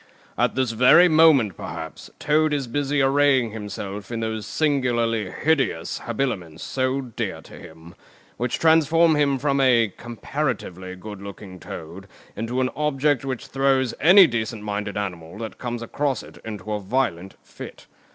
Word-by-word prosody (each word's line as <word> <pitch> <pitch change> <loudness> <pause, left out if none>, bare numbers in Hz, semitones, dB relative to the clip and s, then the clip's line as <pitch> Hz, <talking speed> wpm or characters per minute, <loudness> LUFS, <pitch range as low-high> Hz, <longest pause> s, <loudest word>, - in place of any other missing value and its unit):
At - - +1
this 130 -3 0
very 125 +10 +6
moment, 155 - +5
perhaps, 80 -1 -8
Toad 155 0 +2
is 140 -2 -1
busy 140 +3 0
arraying 135 -3 +3
himself 105 -1 -7
in 115 - -3
those 110 -2 -3
singularly 120 -7 0
hideous 135 - 0
habiliments 105 - -3
so 130 +1 -1
dear 125 -4 -5
to - - -15
him, 80 +2 -13 0.4
which 120 +1 -1
transform 160 +1 +4
him 140 -2 +2
from 140 +1 0
a 120 -6 +3
(comparatively) 115 - -4
good 105 +1 -9
looking 100 -2 -10
Toad 85 +5 -9 0.3
into 115 +4 -2
an 130 - 0
Object 145 -3 0
which 130 -3 -4
throws 135 -2 +1
any 185 +5 +8
decent 115 -5 -3
minded 105 -1 -4
animal 90 -3 -5
that 110 0 -7
comes 120 -1 -4
across 140 +1 -2
it - - -14
into 105 -1 -7
a 105 - -1
violent 95 -4 -2
fit. - - -11
120 Hz, 150 wpm, -23 LUFS, 105-140 Hz, 0.4 s, any